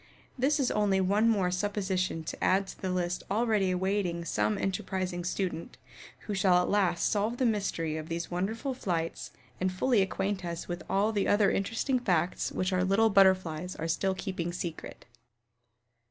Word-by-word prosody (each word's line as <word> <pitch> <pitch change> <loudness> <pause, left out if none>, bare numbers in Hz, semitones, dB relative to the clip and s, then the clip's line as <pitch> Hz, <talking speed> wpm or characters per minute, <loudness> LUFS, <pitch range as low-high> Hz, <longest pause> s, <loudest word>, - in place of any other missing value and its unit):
This 280 +4 +1
is 265 - +1
only 205 -2 +2
one 205 +4 +3
more 195 -5 +2
supposition 190 -3 -1
to - - -6
add 195 +1 +3
to - - -11
the 190 - -2
list 180 -1 -1
already 210 -2 +2
awaiting 185 -2 -1
some 105 -7 0
enterprising 185 -2 -2
student, 180 -1 -3 0.4
who 210 - -5
shall 190 -2 +3
at 180 - 0
last 190 -4 +2
solve 215 +3 0
the 255 - +1
mystery 180 -8 -1
of 155 0 -7
these 170 +1 -4
wonderful 220 +10 -2
flights 170 -9 -3 0.3
and 185 0 0
fully 220 +4 +2
acquaint 195 0 -1
us 170 -1 -5
with 175 0 -4
all 205 +3 +2
the 205 -3 0
other 205 -1 +4
interesting 230 +6 0
facts 180 -6 0
which 185 +1 -1
our 180 0 +2
little 205 +4 +3
Butterflies 185 -3 +3
are 165 - -4
still 190 +3 0
keeping 185 -4 -3
secret. 175 -2 -6
190 Hz, 170 wpm, -29 LUFS, 175-205 Hz, 0.4 s, other